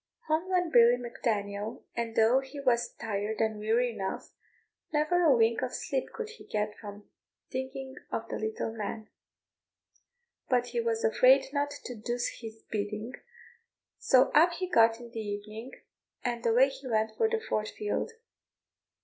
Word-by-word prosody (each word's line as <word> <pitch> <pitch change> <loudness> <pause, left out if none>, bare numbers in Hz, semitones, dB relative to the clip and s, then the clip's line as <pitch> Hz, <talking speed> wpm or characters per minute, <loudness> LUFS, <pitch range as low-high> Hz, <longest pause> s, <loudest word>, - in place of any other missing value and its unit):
Home 320 +4 0
went 360 -3 +1
Billy 240 0 +7
Mac 240 0 -9
Daniel; 205 -1 -2
and 230 -1 -3
though 225 +4 +5
he 270 +2 -8
was 245 -4 +1
tired 210 0 -3
and 220 -1 0
weary 230 +3 +2
enough, 190 -2 -4 0.6
never 310 +4 +2
a 295 -7 +5
wink 225 +1 +3
of 255 -1 -2
sleep 265 -2 -2
could 460 -2 -5
he 450 - -12
get 210 0 -2
for 205 -1 -10 0.5
thinking 265 0 -5 0.2
of 225 - -3
the - - -4
little 220 +1 -3
man; 220 0 -5 1.4
but 245 -2 +2
he 240 0 -2
was 230 -1 -1
afraid 260 +4 +5
not 285 0 +1
to 285 -3 -7
do 235 +1 -4 0.3
his 225 -1 -9
bidding, 210 +3 -3 0.9
so 260 0 +4
up 335 +4 +6
he 370 +2 -3
got 230 -7 +4
in 240 -1 -11
the 230 - -5
evening, 215 +3 -6 0.5
and 240 -1 -1
away 250 +4 +5
he 270 0 -9
went 220 -2 +1
to 450 - +4
the 455 0 0
Fort 215 - -2
field. 210 - -2
235 Hz, 160 wpm, -30 LUFS, 220-265 Hz, 1.4 s, Billy